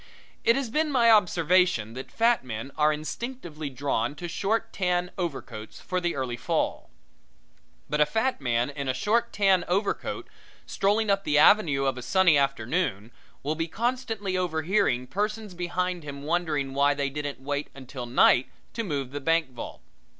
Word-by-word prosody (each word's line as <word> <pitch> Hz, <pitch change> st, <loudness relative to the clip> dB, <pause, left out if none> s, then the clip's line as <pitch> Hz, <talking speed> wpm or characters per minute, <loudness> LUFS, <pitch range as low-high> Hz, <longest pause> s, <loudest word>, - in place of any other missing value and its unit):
It 230 Hz, -, +5 dB
has 270 Hz, -5 st, -2 dB
been 305 Hz, +2 st, +1 dB
my 235 Hz, -4 st, +5 dB
observation 180 Hz, -, +3 dB
that 130 Hz, +2 st, -8 dB
fat 230 Hz, -, +2 dB
men 120 Hz, +2 st, -6 dB
are 150 Hz, 0 st, +3 dB
instinctively 155 Hz, -, -5 dB
drawn 135 Hz, -1 st, -1 dB
to 175 Hz, +4 st, -6 dB
short 200 Hz, +6 st, -1 dB
tan 180 Hz, -1 st, 0 dB
overcoats 140 Hz, -, -5 dB
for 185 Hz, 0 st, -2 dB
the 175 Hz, -1 st, -1 dB
early 130 Hz, -3 st, -3 dB
fall. -, -, -1 dB, 1.0 s
But 150 Hz, 0 st, 0 dB
a 150 Hz, -, +5 dB
fat 225 Hz, -, 0 dB
man 120 Hz, 0 st, 0 dB
in 140 Hz, -1 st, -5 dB
a 130 Hz, -, 0 dB
short 235 Hz, -, +1 dB
tan 195 Hz, -3 st, +3 dB
overcoat, 195 Hz, +3 st, -1 dB, 0.4 s
strolling 205 Hz, +2 st, +1 dB
up 195 Hz, 0 st, +1 dB
the 150 Hz, -4 st, +2 dB
avenue 150 Hz, -5 st, +5 dB
of 130 Hz, -1 st, 0 dB
a -, -, -6 dB
sunny 185 Hz, +4 st, +4 dB
afternoon, 135 Hz, -, 0 dB, 0.3 s
will 145 Hz, +3 st, 0 dB
be 165 Hz, +1 st, -2 dB
constantly 225 Hz, -1 st, -2 dB
overhearing 170 Hz, -5 st, +1 dB
persons 210 Hz, -, -3 dB
behind 180 Hz, 0 st, -2 dB
him 140 Hz, -1 st, -7 dB
wondering 150 Hz, -4 st, -1 dB
why 140 Hz, +1 st, +3 dB
they 140 Hz, -1 st, -1 dB
didn't 145 Hz, -1 st, -4 dB
wait 145 Hz, +2 st, -3 dB
until 130 Hz, -2 st, -7 dB
night 125 Hz, +1 st, +4 dB, 0.2 s
to 230 Hz, -, -2 dB
move 140 Hz, -, -3 dB
the 145 Hz, +1 st, -5 dB
bank 165 Hz, -1 st, +1 dB
vault. 125 Hz, -, -8 dB
160 Hz, 165 wpm, -27 LUFS, 135-195 Hz, 1.0 s, It